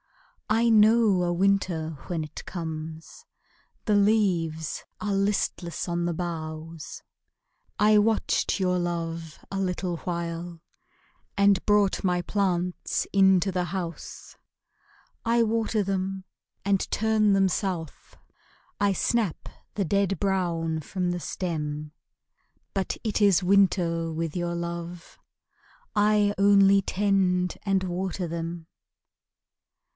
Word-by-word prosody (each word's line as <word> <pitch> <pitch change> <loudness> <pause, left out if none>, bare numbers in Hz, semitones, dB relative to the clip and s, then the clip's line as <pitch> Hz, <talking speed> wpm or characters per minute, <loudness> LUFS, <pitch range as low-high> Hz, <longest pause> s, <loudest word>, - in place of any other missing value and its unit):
I 225 +2 +3
know 215 -3 +5
a 175 - 0
winter 180 -3 +1 0.2
when 165 -3 -2
it 155 0 -9
comes: 160 -2 -7 0.6
The 210 - +2
leaves 185 -7 +1 0.2
are 205 -1 -2
listless 195 -4 -1
on 170 0 -1
the 175 - 0
boughs; 160 -2 -6 0.8
I 210 +1 +5
watched 215 -1 +1
your 180 -1 +1
love 165 -2 -4
a 195 - -2
little 180 -2 -2
while, 170 0 -4 0.8
And 200 -1 +4
brought 205 -1 +2
my 180 -2 +1
plants 180 -2 -1
into 190 -1 +4
the 180 -1 -1
house. 175 -1 -6 0.9
I 230 0 +3
water 225 -1 0
them 190 0 -3 0.4
and 200 -1 +1
turn 215 -1 +2
them 195 -1 +4
south, 180 -5 -4 0.6
I 205 -1 +3
snap 210 -1 -1 0.3
the 200 - 0
dead 195 +1 +1
brown 170 -5 0
from 180 +3 -2
the 175 - -2
stem; 150 -5 -4 0.8
But 195 -2 -2
it 220 -1 -1
is 195 -3 +4
winter 180 -4 +2
with 160 0 -3
your 175 -1 -2
love, 170 0 -6 0.8
I 210 0 +3
only 200 0 +6
tend 190 -2 +1
and 195 -1 +1
water 185 0 -3
them. 165 0 -5
185 Hz, 110 wpm, -26 LUFS, 170-200 Hz, 0.9 s, only